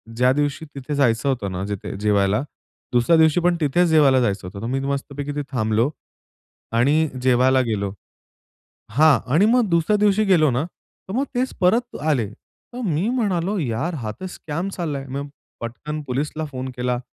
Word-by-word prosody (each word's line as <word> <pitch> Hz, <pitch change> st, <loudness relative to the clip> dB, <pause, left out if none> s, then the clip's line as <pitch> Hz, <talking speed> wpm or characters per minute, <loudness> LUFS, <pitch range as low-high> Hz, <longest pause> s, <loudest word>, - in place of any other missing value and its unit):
ज्या 125 Hz, +2 st, +4 dB
दिवशी 145 Hz, +2 st, -1 dB
तिथे 140 Hz, +2 st, -4 dB
जायचं 135 Hz, -1 st, +2 dB
होतं 115 Hz, -7 st, -1 dB
ना, 90 Hz, +1 st, -3 dB
जिथे 100 Hz, -1 st, -5 dB
जेवायला, 105 Hz, 0 st, +2 dB, 0.5 s
दुसऱ्या 120 Hz, +7 st, +4 dB
दिवशी 160 Hz, +1 st, +4 dB
पण 175 Hz, 0 st, +3 dB
तिथेच 170 Hz, +5 st, +3 dB
जेवायला 145 Hz, -5 st, +5 dB
जायचं 100 Hz, -5 st, -1 dB
होतं, 100 Hz, +2 st, -8 dB
तर -, -, -4 dB
मी 135 Hz, +2 st, -1 dB
मस्तपैकी 140 Hz, +1 st, -3 dB
तिथे 145 Hz, -, -1 dB
थांबलो 110 Hz, 0 st, +1 dB, 0.8 s
आणि 145 Hz, +7 st, +3 dB
जेवायला 130 Hz, +1 st, +4 dB
गेलो 100 Hz, -5 st, -2 dB, 1.0 s
हां 150 Hz, +5 st, +5 dB, 0.2 s
आणि 195 Hz, +6 st, +5 dB
मग 245 Hz, -4 st, +3 dB
दुसऱ्या 170 Hz, +5 st, +3 dB
दिवशी 210 Hz, +1 st, +3 dB
गेलो 170 Hz, -7 st, +4 dB
ना, 125 Hz, +4 st, 0 dB
तर 180 Hz, +2 st, -14 dB
मग 270 Hz, +4 st, +1 dB
तेच 255 Hz, +1 st, 0 dB
परत 230 Hz, +6 st, +2 dB
आले. 145 Hz, -8 st, +1 dB
तर 245 Hz, -, -14 dB
मी 175 Hz, +4 st, 0 dB
म्हणालो, 205 Hz, -5 st, 0 dB
"यार, 145 Hz, +5 st, -2 dB
हा 115 Hz, -7 st, -4 dB
तर 185 Hz, -, -4 dB
स्कॅम 170 Hz, 0 st, -4 dB
चाललाय." 145 Hz, -6 st, -3 dB
मग 140 Hz, +2 st, -4 dB, 0.3 s
पटकन 125 Hz, +7 st, -5 dB
पोलीसला 150 Hz, +4 st, -2 dB
फोन 130 Hz, -1 st, -5 dB
केला, 125 Hz, 0 st, -1 dB
145 Hz, 170 wpm, -22 LUFS, 120-170 Hz, 1.0 s, जेवायला